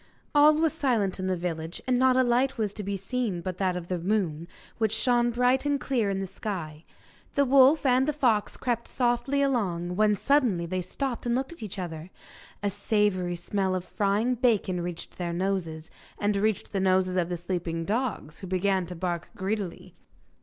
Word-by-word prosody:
All 300 +1 +6
was 320 -1 +2
silent 235 - 0
in 185 - -2
the 185 -1 0
village, 165 -1 -4
and 255 -1 +2
not 260 0 +4
a 260 - +5
light 250 +2 +2
was 210 -3 -1
to 210 - -6
be 200 0 -3
seen 195 -2 -2
but 185 +1 -5
that 185 -2 +1
of 175 -1 -6
the 180 -1 -2
moon, 170 -4 -1 0.3
which 220 -2 +2
shone 240 +1 +2
bright 250 +2 +2
and 290 -1 +1
clear 240 -8 0
in 195 - -1
the 195 - -2
sky. 175 -5 -6 0.5
The 280 - +4
wolf 275 +3 +5
and 260 +1 +4
the - - +3
fox 245 -8 +1
crept 235 -2 -2
softly 245 +3 +1
along, 180 -10 -1
when 210 +1 +3
suddenly 230 -7 +2
they 185 +2 -2
stopped 245 +7 -4
and 235 - +2
looked 265 +4 -2
at 335 - -14
each 210 -2 -6
other; 170 -2 -6 0.5
a 205 - +2
savoury 200 -3 0
smell 190 +2 -1
of 185 -1 -3
frying 205 +6 +1
bacon 220 -7 +1
reached 175 +1 -6
their 170 -1 -2
noses, 170 -4 -2 0.3
and 205 0 0
reached 210 0 0
the 195 - -1
noses 185 -1 +2
of 180 -2 +1
the 175 - -2
sleeping 170 -1 -3
dogs, 215 - -2
who 190 - -7
began 185 0 +1
to 180 - -7
bark 175 0 -3
greedily. 195 -1 -4
200 Hz, 195 wpm, -27 LUFS, 180-245 Hz, 0.5 s, All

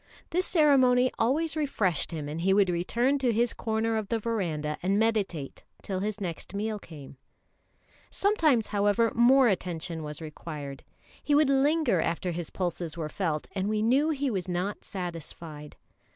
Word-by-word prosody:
This 360 +2 +1
ceremony 260 -6 +4
always 300 +8 +1
refreshed 220 - 0
him, 155 -4 -5
and 155 +3 -4
he 190 +2 +3
would 195 -3 +4
return 240 +11 +1
to 255 -3 +2
his 235 +2 +1
corner 220 0 -1
of 215 -2 -3
the 230 - 0
verandah 175 -10 -2
and 195 +3 +1
meditate 205 -10 -1 0.2
till 190 -2 -3
his 210 +2 -3
next 180 0 -5
meal 215 +1 -2
came. 145 -7 -12 0.9
Sometimes, 315 - +2
however, 205 +2 +2
more 255 +2 +6
attention 175 -4 -2
was 150 -1 -6
required. 150 -3 -7 0.4
He 290 - +1
would 290 -2 +4
linger 275 - +3
after 170 +2 -1
his 170 -1 -4
pulses 175 -3 -3
were 155 -2 -3
felt, 155 -4 -2
and 195 +1 -2
we 215 0 0
knew 270 +7 +3
he 285 -3 0
was 190 -4 -2
not 185 +3 -3
satisfied. 165 -4 -7
205 Hz, 160 wpm, -28 LUFS, 170-245 Hz, 0.9 s, more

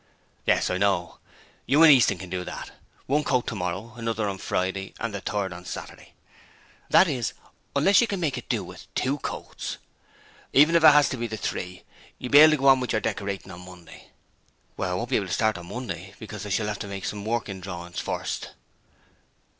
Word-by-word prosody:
'Yes: - - +3
I 90 - -1
know. 95 -3 0 0.5
You 145 +6 +5
and 160 - +10
Easton 115 -7 +4
can 90 0 -9
do 90 -1 -2
that. - - -7 0.3
One 145 +3 +1
coat 125 -4 +1
tomorrow, 105 +2 -4
another 115 -2 -2
on 95 -1 -4
Friday 95 +1 -2
and 115 -3 -3
the 100 - -4
third 100 -3 -2
on 90 0 -10
Saturday 90 - -9 0.8
that 190 - +6
is, 125 -7 -2 0.4
unless 190 +11 +5
you 240 - +2
can 200 -3 -3
make 160 -6 0
it - - -8
do - - 0
with - - -12
two 140 +3 0
coats. - - -5 0.8
Even 150 +5 +6
if 165 - +4
it - - +10
has 150 0 +5
to 130 - -3
be 120 0 -2
the 110 -1 -5
three, 90 -3 -4 0.3
you 125 - -6
will - - -11
be 145 - +9
able 155 +1 +10
to - - +2
go 135 0 +1
on 135 -1 +6
with 125 -2 -2
your 110 - +1
decoratin' 100 -3 -3
on 90 - -10
Monday.' 90 -2 -14 0.7
'I 95 - -1
won't 120 +6 -3
be - - +4
able 100 - -2
to 95 - -3
start 110 -3 +1
on 85 - -11
Monday, 95 -5 -6
because 105 -2 -7
I - - -6
shall 105 +2 0
have 105 -1 -3
to - - -5
make 100 -1 -6
some 105 -1 -4
working 110 -4 -3
drawings 85 -2 -6
first.' - - -4
105 Hz, 210 wpm, -26 LUFS, 95-130 Hz, 0.8 s, and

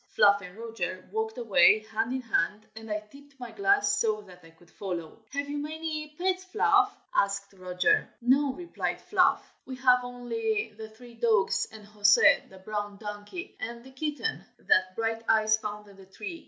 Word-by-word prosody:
Fluff 200 0 +5
and 180 0 -11
Roger 185 -6 -5
walked 220 +2 -2
away 215 -2 +5
hand 225 +2 -1
in 260 0 -2
hand, 215 -2 0
and 225 0 -10
I 210 0 -2
tipped 280 +6 -18
my 245 -2 -7
glass 400 0 +2
so 215 -2 +1
that 180 -3 -16
I 165 - -15
could 165 +1 -22
follow. 175 -1 -6
"Have 285 +1 -3
you 290 0 -3
many 305 0 -5
pets, 370 +1 0
Fluff?" 380 +3 +2 0.2
asked 200 0 0
Roger. 185 - +1
"No!" 270 +4 +3
replied 345 +4 -4
Fluff. 370 -3 +2
"We 260 - -7
have 255 -1 +5
only 245 - -2
the 220 0 -8
three 235 +2 -15
dogs, 225 -4 +2
and 215 -2 -12
José, 205 0 +4
the 190 - -14
brown 205 +1 -5
donkey, 210 - -7
and 235 +1 -6
the 265 - -14
kitten 300 +10 -3
that 185 0 +2
Brighteyes 225 -1 +2
found 210 0 -6
in 200 -1 -16
the 190 -1 -15
tree. 210 - -7
225 Hz, 175 wpm, -28 LUFS, 205-280 Hz, 0.2 s, Fluff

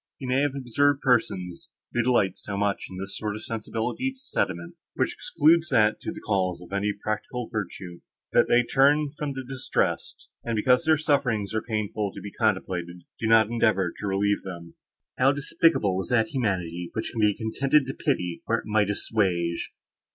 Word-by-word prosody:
You 130 - -6
may 130 +2 +3
have 145 -1 0
observed 140 +2 +1
persons, 95 -8 0 0.2
who 120 - +2
delight 115 -6 +2
so 100 -1 -6
much 100 0 -1
in 95 - -8
this 95 +1 -5
sort 105 -1 -3
of 110 - -8
sensibility 115 - -3
to 265 - -18
sentiment, 90 - -2 0.2
which - - 0
excludes 160 +2 +3
that 110 -5 +3
to - - -4
the - - -9
calls 90 -2 0
of 90 +2 -12
any 100 +1 +1
practical 110 +4 -4
virtue, 90 -4 -5 0.3
that - - +5
they 120 +1 +4
turn 140 +4 +3
from 150 -2 -3
the 135 -1 -6
distressed, 130 -1 -2 0.2
and, 115 -1 -2
because 125 +8 +3
their 155 0 +5
sufferings 125 -10 0
are 110 - 0
painful 105 -2 -2
to - - -6
be 100 - -8
contemplated, 90 -5 -1 0.2
do 115 - -1
not 110 -1 +5
endeavour 105 -6 +2
to 105 - -3
relieve 100 +1 +1
them. 85 -3 -8 0.5
How 135 +2 +5
despicable 135 - +2
is - - -7
that 110 -3 +2
humanity, 90 -8 -2
which 110 - -3
can 115 - -2
be 105 -1 +3
contented 135 +6 +2
to 135 - -4
pity, 90 - -1
where 115 - +1
it - - -7
might 105 -1 +2
assuage!" 90 -5 -1
110 Hz, 185 wpm, -26 LUFS, 95-130 Hz, 0.5 s, that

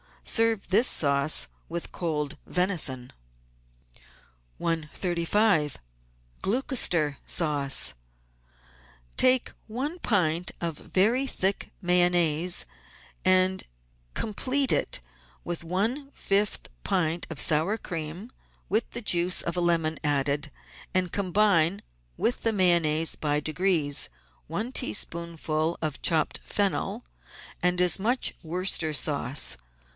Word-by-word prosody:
Serve 225 -3 0
this 230 +6 +4
sauce 140 0 +1 0.2
with 170 0 -5
cold 150 -3 -3
venison. 155 -9 +1 1.5
135 170 +1 0 0.6
QLOUCESTER 190 - +1
SAUCE 145 - +1 1.2
Take 255 -1 +3 0.2
one 275 +10 -4
pint 180 - 0
of 165 -3 -2
very 235 +8 +1
thick 195 -5 -2
Mayonnaise 175 -1 +3 0.6
and 185 0 +3 0.5
complete 260 +6 +2
it - - +1 0.4
with 170 -1 -4
one 225 - -2
fifth 200 +1 0
pint 170 -3 0
of 160 - -5
sour 160 +8 +4
cream 170 +5 -7 0.4
with 215 +4 0
the 235 - -4
juice 180 -3 +3
of 170 - -3
a - - +1
lemon 165 -2 +1
added, 145 0 0 0.4
and 185 -2 +1
combine 195 -2 +2 0.4
with 245 - 0
the 225 - +1
Mayonnaise 170 -5 +3
by 150 -1 -1
degrees; 155 -2 +1 0.4
one 210 - -4
tea 110 - 0
spoonful 165 +2 -1
of 155 -3 -3
chopped 160 -2 +1
fennel 205 +2 -2 0.6
and 180 0 +1
as 180 +1 +4
much 240 +6 +1
Worcester 170 -1 +2
sauce. 140 -1 +1
175 Hz, 100 wpm, -26 LUFS, 155-200 Hz, 1.5 s, this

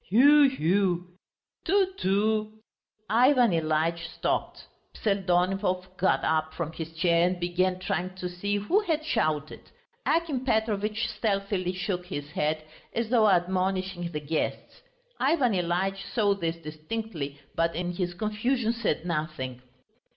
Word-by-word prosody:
"Hu 285 +7 +7
hu...." 180 -5 +1 0.6
"Tu 385 -1 +2
tu!" 215 - +1 0.5
Ivan 245 0 +5
Ilyitch 165 +1 0
stopped. - - -2 0.3
Pseldonimov 185 -1 0
got 185 +1 +2
up 155 0 0
from 165 -2 -3
his 160 0 -6
chair 170 +1 +3
and 180 0 -2
began 180 +1 +1
trying 185 0 -3
to 185 -1 -4
see 180 +3 -2
who 210 - +2
had 320 -7 -1
shouted. 155 - -1 0.4
Akim 320 -6 +1
Petrovitch 220 -3 0
stealthily 195 -4 -1
shook 180 -1 -3
his 145 -5 -5
head, 155 +1 -1 0.3
as 230 -1 -1
though 225 -3 +5
admonishing 185 -1 0
the 150 - -3
guests. 150 +2 -3 0.4
Ivan 270 -5 +3
Ilyitch 185 +2 0
saw 205 -4 +3
this 170 -4 -2
distinctly, 155 -1 -5
but 165 0 0
in 175 +1 -2
his 175 -1 -3
confusion 225 +4 0
said 220 -8 -1
nothing. 150 -7 -3
185 Hz, 130 wpm, -27 LUFS, 170-220 Hz, 0.6 s, Hu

